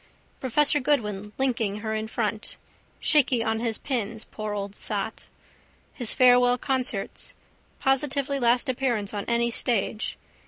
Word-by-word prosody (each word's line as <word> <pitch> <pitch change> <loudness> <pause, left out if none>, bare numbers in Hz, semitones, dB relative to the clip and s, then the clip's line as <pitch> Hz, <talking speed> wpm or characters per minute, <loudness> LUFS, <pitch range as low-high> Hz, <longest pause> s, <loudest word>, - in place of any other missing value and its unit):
Professor 295 +4 +3
Goodwin 210 -8 0
linking 230 -6 0
her 220 0 -2
in 220 0 -2
front. 220 -1 -2 0.4
Shaky 265 -6 +3
on 220 -1 0
his 230 -1 -1
pins, 225 -4 -2
poor 215 -1 -5
old 200 0 -4
sot. - - -3 0.7
His 240 -4 -3
farewell 245 -1 +5
concerts. 255 -6 -2 0.4
Positively 275 +1 +1
last 245 +2 +3
appearance 245 -6 -1
on 205 -1 -3
any 235 0 +1
stage. 225 -2 +1
235 Hz, 125 wpm, -26 LUFS, 215-260 Hz, 0.7 s, farewell